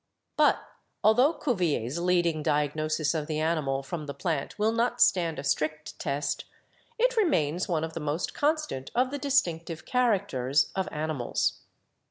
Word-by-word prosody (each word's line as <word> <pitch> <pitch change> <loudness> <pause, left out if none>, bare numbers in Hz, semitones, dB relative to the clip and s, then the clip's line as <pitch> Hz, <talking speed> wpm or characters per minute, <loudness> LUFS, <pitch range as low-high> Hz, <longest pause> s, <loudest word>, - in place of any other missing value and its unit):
"But - - +4 0.5
altho 250 +8 +5
Cuvier's 170 - -1
leading 175 -3 +2
diagnosis 150 +1 0
of 155 -2 -2
the 155 -1 -2
animal 155 -4 0
from 150 +1 -5
the 140 - -5
plant 165 +1 -2
will 215 +1 +2
not 240 +1 0
stand 170 -7 +3
a - - -5
strict 150 +2 -2
test, 145 0 -2 0.5
it - - +2
remains 180 - +1
one 160 -3 0
of 160 0 -4
the 165 - -4
most 150 +3 -2
constant 300 - -1
of 255 +2 +2
the 285 - -3
distinctive 170 - 0
characters 195 - +1
of 190 -1 -1
animals. 150 -5 -1
165 Hz, 150 wpm, -28 LUFS, 150-220 Hz, 0.5 s, altho